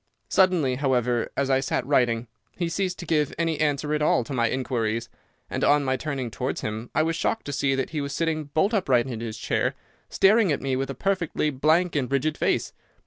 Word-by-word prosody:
Suddenly, 175 -9 +3
however, 125 -3 0
as 140 -1 +1
I 130 - +4
sat 130 -1 -1
writing, 120 -4 +2 0.3
he 170 -2 -1
ceased 180 +1 -2
to 175 - -7
give 150 -3 0
any 165 -2 0
answer 150 0 0
at 150 - 0
all 150 -4 +3
to 140 - -7
my 115 -3 +1
inquiries, 115 -3 -2 0.4
and - - -3
on 145 0 +4
my 130 0 +1
turning 135 -4 -4
towards 130 +4 -3
him 110 +2 -4
I 155 - +4
was 165 +1 0
shocked 225 +6 -1
to 145 - -4
see 135 -1 +1
that 135 - -2
he 155 -2 -2
was 140 0 -4
sitting 160 -1 -1
bolt 160 +9 +1
upright 130 - +2
in 120 -4 -5
his 115 -1 -5
chair, - - -1 0.3
staring 205 -1 +4
at 145 - 0
me 135 -1 0
with 135 +1 -2
a 135 - -4
perfectly 170 -2 0
blank 160 +6 +2
and 135 -4 -1
rigid 145 +3 +1
face. - - 0
140 Hz, 215 wpm, -25 LUFS, 125-160 Hz, 0.4 s, I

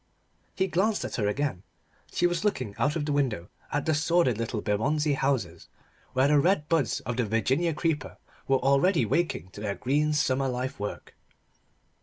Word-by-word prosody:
He 190 - +1
glanced 195 +4 0
at - - -4
her 105 -4 +1
again. 130 -4 -1 0.5
She - - +1
was 175 0 +1
looking 130 - -1
out 145 +2 +1
of 155 -3 -1
the 150 - -1
window 120 -12 -1 0.2
at 145 -1 -1
the 160 - +2
sordid 155 -6 +2
little 115 -1 -2
Bermondsey 145 +10 +1
houses, 130 -12 -1 0.5
where 130 +2 +3
the 145 0 +4
red 150 -1 +2
buds 160 -7 +1
of 120 +1 -4
the 125 - +1
Virginia 135 +10 +1
creeper 155 -4 -2 0.3
were 135 - +4
already 140 - +3
waking 135 - -1
to 100 - -10
their 100 -1 -2
green 150 +4 +1
summer 135 -3 +1
life 130 0 -3
work. 105 0 -6
140 Hz, 175 wpm, -27 LUFS, 115-160 Hz, 0.5 s, the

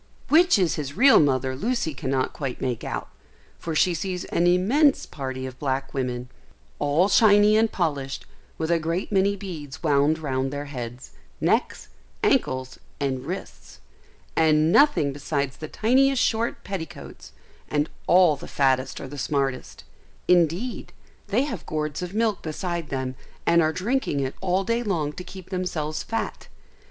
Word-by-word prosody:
Which 345 0 +6
is 180 -4 +1
his 140 -1 -5
real 270 +1 +7
mother 130 -3 +1
Lucy 210 - -1
cannot 130 0 -1
quite 135 -4 -4
make 125 -3 -2
out, - - -4 0.5
for 165 -2 -4
she 180 +3 +3
sees 180 +2 -3
an 175 - +1
immense 240 - +3
party 130 -2 -5
of 130 0 -8
black 135 -1 -2
women, 125 -2 -3 0.5
all 150 +6 +3
shiny 205 0 +5
and 220 0 +3
polished, 145 -6 -2 0.3
with 160 +1 -1
a 170 - +3
great 165 +6 -2
many 200 0 +2
beads 160 -7 -8
wound 145 0 +3
round 135 -4 -2
their 145 0 -4
heads, 125 -3 -7 0.3
necks, - - 0 0.3
ankles, 130 0 +1 0.2
and 135 -1 -2
wrists; 185 +3 -7 0.6
and 155 0 +4
nothing 225 - +4
besides 140 -1 -2
the 155 - -6
tiniest 260 - +3
short 230 +1 -1
petticoats: 185 -5 -7 0.4
and 150 0 +1 0.2
all 180 -4 +6
the - - -10
fattest 130 -1 +1
are 135 - -6
the 145 +1 -8
smartest; 135 -1 -2 0.4
indeed, 180 +7 +1 0.3
they 215 +6 +2
have 235 - -5
gourds 155 0 -3
of 180 +2 -5
milk 220 -3 +1
beside 170 0 -4
them, 130 -1 -3 0.3
and 170 0 +5
are 155 -1 +2
drinking 220 - -1
it 135 -1 -2
all 190 +1 +1
day 230 +4 0
long 165 -10 -1
to 180 - -7
keep 185 +1 -11
themselves 160 -5 -2
fat. 225 -1 -4
160 Hz, 155 wpm, -25 LUFS, 140-195 Hz, 0.6 s, real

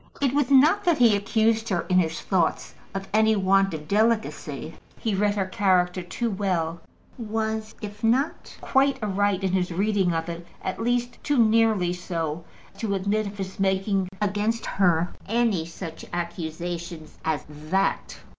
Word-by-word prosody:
It 275 -2 +1
was 290 -3 +1
not 300 +9 +5
that 345 -3 +3
he 235 -4 +5
accused 220 +2 +1
her 175 -4 +1
in 185 -1 +2
his 160 -2 0
thoughts 180 -4 0 0.2
of 195 0 -4
any 220 0 +4
want 195 0 +3
of 150 -1 -8
delicacy. 220 +4 0 0.2
He 220 -4 -2
read 205 +1 +1
her 195 -2 0
character 185 -1 +1
too 220 +6 -3
well; 175 -4 -1 0.4
was, 220 -1 -3
if 205 +1 -7
not 255 +7 0
quite 275 0 +2
aright 205 -1 +1
in 190 - +1
his 180 -1 0
reading 195 0 +1
of 165 0 -2
it, 170 0 -6 0.2
at 190 - -3
least 245 +1 -1
too 290 -2 +1
nearly 220 -5 +3
so 165 -3 -3 0.4
to 205 -3 -1
admit 200 +2 0
of 200 +1 -8
his 190 -1 -6
making 195 0 +1
against 210 +2 0
her 175 -3 +2
any 220 -7 +1
such 165 -1 -8
accusation 170 -1 -4 0.2
as 155 -3 -1
that. 155 +6 -1
195 Hz, 155 wpm, -25 LUFS, 175-220 Hz, 0.4 s, not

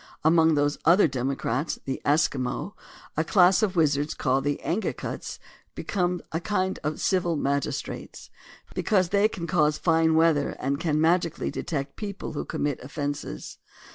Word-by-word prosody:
Among 160 0 +5
those 145 0 +1
other 170 +4 +6
democrats, 135 +1 -2
the 135 - -3
Eskimo, 145 +3 0 0.4
a 160 - +1
class 180 +2 +4
of 200 -4 0
wizards, 150 -2 +1
called 135 +2 0
Angakuts, 165 +7 -3 0.4
become 180 -3 -1
"a 160 - -1
kind 185 +1 -1
of 150 0 -2
civil 175 -3 +1
magis 140 -1 0
trates - - -9 0.2
" - - -21
because 185 -5 +1
they 205 +2 +4
can 175 -5 -6
cause 155 -4 +2
fine 160 -1 +3
weather, 160 -3 +3
and 140 +2 -2
can 155 -3 0
magically 165 +1 +1
detect 140 -3 -4
people 200 -5 -5
who 145 - -4
commit 145 -2 -2
ojffences. 145 - -5
160 Hz, 145 wpm, -26 LUFS, 145-175 Hz, 0.4 s, other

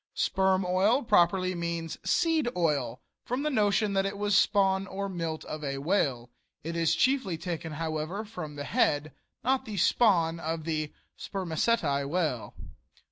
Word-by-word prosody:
Sperm 190 -1 +2
oil 200 +9 +3
properly 185 -3 +3
means 170 -2 -4
"seed 325 -7 +2
oil," 140 -8 0 0.2
from 250 +4 -2
the 300 - 0
notion 210 -3 +2
that 195 0 +2
it 195 +1 -3
was 205 0 +1
spawn 195 -1 +3
or 200 +1 -4
milt 165 -4 -4
of 155 0 -6
a 135 -1 -2
whale. 135 -7 0 0.3
It 165 +2 -4
is 165 0 +2
chiefly 245 -5 +1
taken, 165 -2 -5
however, 160 +6 -3
from 160 -8 -7
the 145 - -5
head, 145 +1 +1 0.3
not 260 +2 +1
the 210 -2 -6
spawn 175 -5 +3
of 160 0 -3
the 155 -2 -2 0.3
"spermaceti" 165 -5 0
whale. 150 -5 -2
175 Hz, 150 wpm, -28 LUFS, 155-200 Hz, 0.3 s, oil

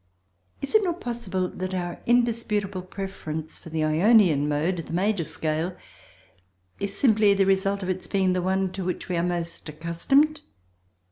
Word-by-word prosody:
Is 275 - -2
it 435 -1 +5
not 355 -2 -1
possible 200 -7 -2
that 185 +1 -5
our 175 -1 -4
indisputable 225 -5 +1
preference 180 -5 -6
for - - -11
the 160 -1 -1
Ionian 160 -2 +4
mode 155 +5 0
(the 165 -1 -6
major 190 +1 +1
scale) 160 +3 -3 1.0
is 200 0 -2
simply 215 -5 +4
the 195 0 +3
result 195 +1 +1
of 185 - -3
its 185 0 -3
being 190 -2 +2
the 180 - 0
one 190 +1 0
to 190 0 -5
which 180 0 -3
we 180 - 0
are - - +2
most 170 -2 -3
accustomed? 220 - +1
185 Hz, 160 wpm, -25 LUFS, 170-205 Hz, 1.0 s, it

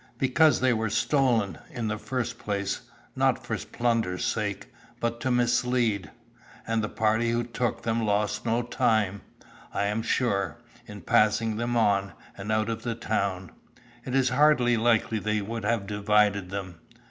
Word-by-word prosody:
"Because 150 +4 +3
they 130 -1 +4
were 110 -1 -1
stolen, 115 -2 +1
in 120 -3 -4
the 105 0 -2
first 120 0 -3
place, 100 -1 -2 0.3
not - - +1
for - - -2
plunder's 115 -7 -1
sake, 105 -3 -3 0.3
but 115 0 -2
to 130 - -1
mislead; 120 -3 +1 0.6
and 115 -1 0
the 105 - -2
party 110 +1 +1
who 120 +1 +1
took 120 0 -2
them 115 0 0
lost 105 0 0
no 115 +1 0
time, 110 -4 +1 0.5
I - - -1
am 105 +2 0
sure, 100 - 0 0.3
in 105 -1 -9
passing 110 +4 +2
them 120 +1 -1
on, 100 -4 +2 0.2
and 100 +2 -5
out 110 0 +1
of 115 0 -3
the 115 -1 -3
town. 95 -5 -2 0.5
It 130 +1 -3
is 130 -1 +3
hardly 125 -2 +4
likely 115 -1 +2
they 105 +1 0
would 110 +1 -5
have 115 -2 0
divided 105 -1 +2
them." 95 -3 -6
110 Hz, 160 wpm, -27 LUFS, 105-120 Hz, 0.6 s, they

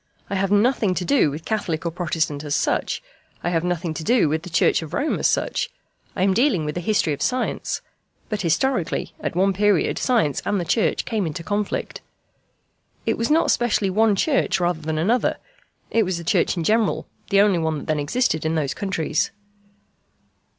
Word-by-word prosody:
I - - -1
have 195 0 0
nothing 205 -2 +2
to 180 - -2
do 275 - +3
with 150 +3 -7
Catholic 180 -7 -2
or 170 - 0
Protestant 160 -4 -2
as 145 -1 -1
such. - - 0 0.4
I 175 - 0
have 165 -1 +1
nothing 175 -2 -1
to 160 - -5
do 230 -5 +3
with 155 +1 0
the 180 - -9
Church 165 - +3
of 160 +1 -6
Rome 305 - 0
as - - +3
such. - - 0 0.5
I 185 - 0
am 190 0 +3
dealing 225 - +2
with 150 - -2
the 175 - -3
history 200 -4 +1
of 140 - -6
science. 255 -1 -1 0.5
But 215 -2 -3
historically 185 - 0
at - - -4
one 195 +2 +3
period 205 -2 +2
science 225 - +1
and 205 - 0
the 175 - -2
Church 220 - +1
came 215 -6 -1
into 160 +2 -5
conflict. 205 +2 -2 1.0
It 225 - +1
was 230 - -1
not 320 +2 +3
specially 215 -5 +1
one 215 +1 +3
Church 270 -3 +1
rather 175 -2 0
than 155 0 -2
another 220 +10 +1 0.5
it 230 - +3
was 185 -4 0
the 170 - -6
Church 170 - +1
in 170 - -1
general, 215 +4 +1 0.2
the 200 -1 +4
only 200 -4 +3
one 160 -1 -1
that 145 - -7
then 155 -1 0
existed 160 - 0
in 160 +1 0
those 145 -4 0
countries. 160 -4 -1
185 Hz, 195 wpm, -22 LUFS, 160-215 Hz, 1.0 s, the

